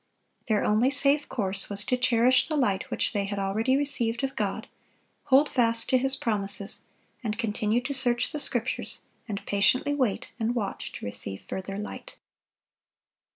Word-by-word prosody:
Their 215 Hz, -3 st, +2 dB
only 220 Hz, +5 st, +3 dB
safe 280 Hz, +2 st, +2 dB
course 195 Hz, -3 st, 0 dB
was 205 Hz, +1 st, -2 dB
to 250 Hz, -, +2 dB
cherish 250 Hz, 0 st, +3 dB
the 315 Hz, -, -1 dB
light 200 Hz, -8 st, +1 dB
which -, -, 0 dB
they 200 Hz, -1 st, 0 dB
had 200 Hz, +1 st, -4 dB
already 215 Hz, +7 st, +1 dB
received 245 Hz, -4 st, +2 dB
of 270 Hz, 0 st, -2 dB
God, -, -, -2 dB, 0.6 s
hold 280 Hz, +2 st, +5 dB
fast 230 Hz, -4 st, +1 dB
to 255 Hz, -, +4 dB
His 270 Hz, +1 st, +2 dB
promises, 200 Hz, -4 st, -3 dB, 0.4 s
and 215 Hz, -2 st, -2 dB
continue 220 Hz, 0 st, 0 dB
to 275 Hz, +3 st, -3 dB
search 245 Hz, -3 st, +1 dB
the 300 Hz, -, -3 dB
Scriptures, 245 Hz, -3 st, -2 dB, 0.2 s
and 200 Hz, -2 st, -5 dB
patiently 205 Hz, +8 st, +3 dB
wait 255 Hz, -8 st, -1 dB
and 230 Hz, +2 st, 0 dB
watch 205 Hz, -5 st, -3 dB
to -, -, -7 dB
receive 100 Hz, -1 st, -5 dB
further 195 Hz, +1 st, -5 dB
light. 210 Hz, -, -7 dB
230 Hz, 160 wpm, -27 LUFS, 205-260 Hz, 0.6 s, hold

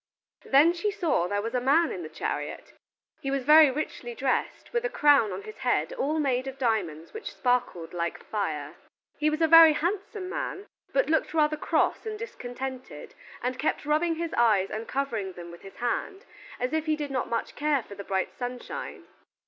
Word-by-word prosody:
Then 295 Hz, +6 st, +5 dB
she 355 Hz, +4 st, -1 dB
saw 345 Hz, -, 0 dB
there 205 Hz, +2 st, -1 dB
was 230 Hz, +2 st, -4 dB
a 250 Hz, -, +1 dB
man 310 Hz, +6 st, +3 dB
in 180 Hz, -, -5 dB
the 155 Hz, -, -7 dB
chariot. -, -, -4 dB, 0.5 s
He 270 Hz, -, -4 dB
was 275 Hz, -1 st, -1 dB
very 305 Hz, +2 st, +8 dB
richly 255 Hz, -4 st, -4 dB
dressed, 265 Hz, -, -2 dB
with 475 Hz, 0 st, 0 dB
a -, -, 0 dB
crown 290 Hz, -, +4 dB
on -, -, -5 dB
his 430 Hz, 0 st, -10 dB
head -, -, 0 dB
all 315 Hz, -, -1 dB
made 265 Hz, -3 st, 0 dB
of 270 Hz, 0 st, -6 dB
diamonds 195 Hz, -, -1 dB
which 440 Hz, -, -6 dB
sparkled 245 Hz, -10 st, -1 dB
like 170 Hz, -1 st, -3 dB
fire. 155 Hz, -9 st, -3 dB, 0.4 s
He 305 Hz, 0 st, +3 dB
was 310 Hz, +1 st, -2 dB
a -, -, +5 dB
very 330 Hz, -1 st, +9 dB
handsome 375 Hz, +4 st, -2 dB
man, 385 Hz, +1 st, -4 dB, 0.3 s
but -, -, +2 dB
looked 320 Hz, 0 st, +1 dB
rather 305 Hz, -1 st, +3 dB
cross 305 Hz, -, 0 dB
and 430 Hz, -1 st, -4 dB
discontented, 260 Hz, -, -7 dB, 0.3 s
and 250 Hz, +1 st, 0 dB
he 250 Hz, -, -15 dB
kept 305 Hz, -, -1 dB
rubbing 315 Hz, +3 st, +2 dB
his 335 Hz, 0 st, -4 dB
eyes 210 Hz, -5 st, +3 dB
and 220 Hz, +1 st, -5 dB
covering 230 Hz, -9 st, -2 dB
them 175 Hz, -1 st, -9 dB
with 170 Hz, -, -12 dB
his 195 Hz, -, -12 dB
hand, 385 Hz, -, -3 dB, 0.3 s
as 250 Hz, +4 st, -2 dB
if 315 Hz, 0 st, -1 dB
he 310 Hz, -, +3 dB
did 295 Hz, -2 st, -5 dB
not 245 Hz, -3 st, -2 dB
care 300 Hz, 0 st, +1 dB
much 245 Hz, -, -5 dB
for -, -, -10 dB
the 200 Hz, 0 st, -8 dB
bright 190 Hz, -1 st, -2 dB
sunshine. 245 Hz, 0 st, -6 dB
270 Hz, 195 wpm, -27 LUFS, 225-320 Hz, 0.5 s, very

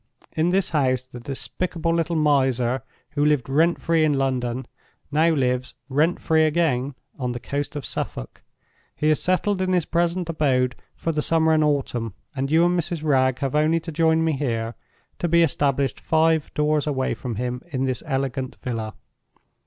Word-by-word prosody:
In 160 Hz, +2 st, +2 dB
this 190 Hz, +1 st, +1 dB
house 130 Hz, -5 st, +1 dB
the 125 Hz, -1 st, -10 dB
despicable 165 Hz, +6 st, -2 dB
little 170 Hz, 0 st, 0 dB
miser, 130 Hz, -5 st, +2 dB, 0.3 s
who 145 Hz, -1 st, 0 dB
lived 150 Hz, -5 st, +2 dB
rent 160 Hz, +6 st, +2 dB
free 165 Hz, -1 st, +2 dB
in 155 Hz, -1 st, +3 dB
London, 130 Hz, -2 st, -1 dB, 0.5 s
now 155 Hz, +3 st, +4 dB
lives, 130 Hz, -4 st, 0 dB
rent 155 Hz, +6 st, +2 dB
free 160 Hz, 0 st, +2 dB
again, 145 Hz, -5 st, +1 dB, 0.2 s
on 125 Hz, -2 st, -2 dB
the 120 Hz, -, -5 dB
coast 145 Hz, +4 st, -4 dB
of 145 Hz, -, -4 dB
Suffolk. -, -, -5 dB, 0.5 s
He 155 Hz, +1 st, +2 dB
is 155 Hz, -, +1 dB
settled 185 Hz, +2 st, +1 dB
in 185 Hz, 0 st, +1 dB
his 175 Hz, -3 st, +2 dB
present 175 Hz, +1 st, 0 dB
abode 130 Hz, -6 st, +1 dB, 0.2 s
for 165 Hz, -, -2 dB
the 155 Hz, -1 st, -1 dB
summer 160 Hz, 0 st, +3 dB
and 155 Hz, -1 st, +3 dB
autumn; 125 Hz, -7 st, -1 dB, 0.2 s
and 135 Hz, +1 st, -1 dB
you 165 Hz, +2 st, +5 dB
and 175 Hz, 0 st, +2 dB
Mrs. 165 Hz, -1 st, -3 dB
Wragge 130 Hz, -4 st, +2 dB
have 135 Hz, -2 st, -1 dB
only 155 Hz, +2 st, +3 dB
to 165 Hz, 0 st, -7 dB
join 160 Hz, +1 st, +2 dB
me 160 Hz, -, +2 dB
here, 115 Hz, -5 st, -2 dB, 0.5 s
to 175 Hz, -, 0 dB
be 170 Hz, 0 st, +4 dB
established 140 Hz, -3 st, +1 dB
five 160 Hz, -1 st, +2 dB
doors 150 Hz, 0 st, +1 dB
away 130 Hz, -3 st, 0 dB
from 120 Hz, -3 st, -5 dB
him 125 Hz, +2 st, -3 dB
in 135 Hz, -1 st, -2 dB
this 130 Hz, -2 st, -2 dB
elegant 135 Hz, -2 st, -2 dB
villa. 115 Hz, -3 st, -4 dB
150 Hz, 175 wpm, -23 LUFS, 130-160 Hz, 0.5 s, you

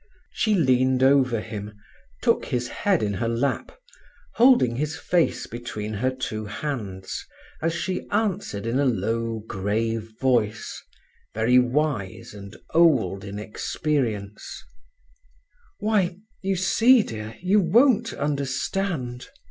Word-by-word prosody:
She 215 Hz, -2 st, +1 dB
leaned 130 Hz, -5 st, +3 dB
over 130 Hz, -4 st, +4 dB
him, 105 Hz, -1 st, -7 dB, 0.5 s
took -, -, +2 dB
his 125 Hz, 0 st, -2 dB
head 195 Hz, -, +1 dB
in 100 Hz, -1 st, 0 dB
her 115 Hz, +4 st, -2 dB
lap, 115 Hz, +4 st, -1 dB, 0.6 s
holding 230 Hz, -, +5 dB
his 150 Hz, +3 st, -2 dB
face 175 Hz, -2 st, +1 dB
between 110 Hz, -3 st, -6 dB
her 120 Hz, +5 st, 0 dB
two 110 Hz, -4 st, -4 dB
hands 105 Hz, -5 st, -5 dB, 0.4 s
as 165 Hz, +1 st, 0 dB
she 180 Hz, +2 st, -3 dB
answered 200 Hz, -, -1 dB
in 120 Hz, +4 st, 0 dB
a 140 Hz, -, +2 dB
low, 115 Hz, 0 st, -1 dB
grave 110 Hz, +3 st, -2 dB
voice, 115 Hz, -5 st, 0 dB, 0.5 s
very 120 Hz, +3 st, +4 dB
wise 125 Hz, -7 st, -1 dB
and 100 Hz, 0 st, -10 dB, 0.2 s
old 155 Hz, -, +3 dB
in 100 Hz, 0 st, -6 dB
experience: 105 Hz, -1 st, -3 dB, 1.2 s
"Why, 205 Hz, -4 st, +1 dB, 0.2 s
you 195 Hz, -1 st, 0 dB
see, 225 Hz, +7 st, +5 dB
dear, 110 Hz, -, -7 dB
you 190 Hz, +4 st, +3 dB
won't 230 Hz, +5 st, +4 dB
understand. 140 Hz, -1 st, -2 dB
130 Hz, 115 wpm, -24 LUFS, 110-170 Hz, 1.2 s, holding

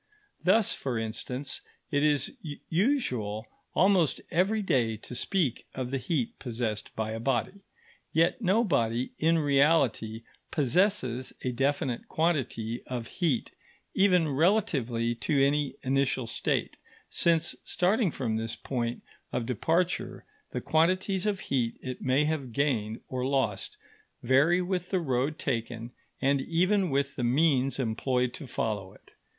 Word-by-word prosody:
Thus, 205 Hz, +3 st, +4 dB
for 130 Hz, -4 st, -3 dB
instance, 125 Hz, +5 st, -4 dB, 0.3 s
it 145 Hz, -1 st, +2 dB
is 150 Hz, -1 st, +2 dB, 0.4 s
usual 130 Hz, -, 0 dB, 0.3 s
almost 185 Hz, -5 st, +4 dB
every 195 Hz, +5 st, +2 dB
day 120 Hz, -, +1 dB
to 115 Hz, -, -10 dB
speak 145 Hz, -, 0 dB
of 130 Hz, -1 st, -3 dB
the 135 Hz, -, 0 dB
heat 130 Hz, -1 st, -2 dB
possessed 115 Hz, -4 st, -3 dB
by 110 Hz, 0 st, -2 dB
a 110 Hz, -, -4 dB
body. 135 Hz, -, -1 dB, 0.5 s
Yet 165 Hz, +10 st, +2 dB
no 210 Hz, +3 st, +3 dB
body 120 Hz, -, 0 dB
in 165 Hz, +1 st, +3 dB
reality 140 Hz, -7 st, +2 dB, 0.3 s
possesses 140 Hz, -, +1 dB
a 125 Hz, -, 0 dB
definite 135 Hz, -1 st, -1 dB
quantity 125 Hz, -8 st, -1 dB
of 125 Hz, -2 st, -4 dB
heat 155 Hz, -10 st, +1 dB, 0.4 s
even 180 Hz, -4 st, +4 dB
relatively 135 Hz, -, +1 dB
to 135 Hz, +5 st, 0 dB
any 140 Hz, +1 st, +2 dB
initial 135 Hz, -1 st, +1 dB
state; 115 Hz, -, -1 dB, 0.3 s
since 165 Hz, -1 st, +3 dB
starting 195 Hz, +3 st, +2 dB
from 120 Hz, -7 st, -2 dB
this 115 Hz, 0 st, -2 dB
point 120 Hz, -2 st, -3 dB, 0.3 s
of 125 Hz, -2 st, -1 dB
departure, 165 Hz, -, 0 dB, 0.2 s
the -, -, -4 dB
quantities 185 Hz, +4 st, +2 dB
of 200 Hz, -2 st, -1 dB
heat 120 Hz, -4 st, -1 dB
it 130 Hz, -1 st, -6 dB
may 130 Hz, +3 st, +2 dB
have 145 Hz, -6 st, -2 dB
gained 115 Hz, -5 st, 0 dB
or 130 Hz, -1 st, -3 dB
lost 130 Hz, -7 st, -1 dB, 0.5 s
vary 145 Hz, +9 st, +4 dB
with 180 Hz, -1 st, -2 dB
the 190 Hz, -, +1 dB
road 140 Hz, 0 st, 0 dB
taken 115 Hz, -2 st, -3 dB, 0.3 s
and 140 Hz, 0 st, +2 dB
even 185 Hz, +5 st, +2 dB
with 140 Hz, 0 st, 0 dB
the 125 Hz, -, -3 dB
means 135 Hz, +1 st, +3 dB
employed 125 Hz, +1 st, 0 dB
to 145 Hz, -, -8 dB
follow 105 Hz, -5 st, -3 dB
it. -, -, -20 dB
135 Hz, 135 wpm, -29 LUFS, 120-170 Hz, 0.5 s, Thus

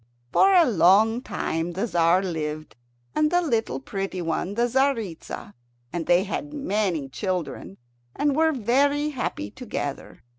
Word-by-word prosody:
For 390 Hz, -, +5 dB
a 350 Hz, -2 st, +7 dB
long 215 Hz, -, +4 dB
time 165 Hz, -7 st, -3 dB
the 195 Hz, +6 st, -1 dB
Tzar 175 Hz, -2 st, +3 dB
lived, 155 Hz, -4 st, -4 dB, 0.4 s
and 305 Hz, -, +2 dB
the 350 Hz, +2 st, +3 dB
little 230 Hz, -, -1 dB
pretty 195 Hz, +7 st, -4 dB
one 175 Hz, +3 st, -2 dB
the 235 Hz, +2 st, +2 dB
Tzaritza, 235 Hz, -, -1 dB, 0.4 s
and 170 Hz, -2 st, -3 dB
they 175 Hz, +1 st, +4 dB
had 290 Hz, +9 st, -5 dB
many 200 Hz, -, -1 dB
children, 165 Hz, -, -4 dB, 0.4 s
and 290 Hz, -1 st, +1 dB
were 320 Hz, +1 st, +3 dB
very 280 Hz, +4 st, +1 dB
happy 250 Hz, -, -4 dB
together. -, -, -6 dB
200 Hz, 140 wpm, -25 LUFS, 170-275 Hz, 0.4 s, a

